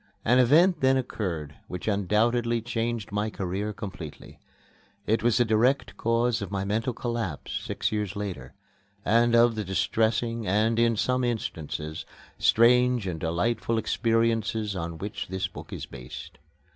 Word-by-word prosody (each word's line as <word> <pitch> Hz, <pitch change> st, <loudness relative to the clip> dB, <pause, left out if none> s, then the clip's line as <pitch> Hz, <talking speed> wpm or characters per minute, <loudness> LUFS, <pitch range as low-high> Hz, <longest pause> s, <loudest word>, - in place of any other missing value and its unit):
An 125 Hz, +3 st, +5 dB
event 160 Hz, +8 st, +5 dB
then 130 Hz, 0 st, +4 dB
occurred 85 Hz, -, -3 dB
which 90 Hz, -, -6 dB
undoubtedly 115 Hz, +4 st, +2 dB
changed 115 Hz, -2 st, -3 dB
my 105 Hz, +1 st, -1 dB
career 100 Hz, +1 st, -3 dB
completely. 95 Hz, -8 st, -8 dB, 0.7 s
It 110 Hz, +2 st, +1 dB
was 120 Hz, 0 st, +3 dB
the 120 Hz, -, +4 dB
direct 115 Hz, +5 st, +2 dB
cause 115 Hz, 0 st, +1 dB
of 100 Hz, -, -4 dB
my 100 Hz, -1 st, -2 dB
mental 110 Hz, +5 st, 0 dB
collapse 115 Hz, -, -4 dB
six -, -, -2 dB
years 105 Hz, -3 st, -2 dB
later, 90 Hz, -11 st, -5 dB, 0.5 s
and 115 Hz, +2 st, +4 dB
of 120 Hz, 0 st, +5 dB
the 110 Hz, -1 st, -3 dB
distressing 115 Hz, +4 st, 0 dB
and, 110 Hz, +4 st, +2 dB
in 115 Hz, -1 st, +3 dB
some 125 Hz, +3 st, +1 dB
instances, 80 Hz, -9 st, -3 dB, 0.4 s
strange 125 Hz, 0 st, +4 dB
and 85 Hz, -4 st, -3 dB
delightful 90 Hz, +8 st, 0 dB
experiences 115 Hz, -2 st, 0 dB
on 85 Hz, -2 st, -4 dB
which 100 Hz, +5 st, -5 dB
this 95 Hz, 0 st, -2 dB
book 95 Hz, -, -11 dB
is -, -, -5 dB
based. 60 Hz, +1 st, -10 dB
110 Hz, 145 wpm, -27 LUFS, 95-120 Hz, 0.7 s, An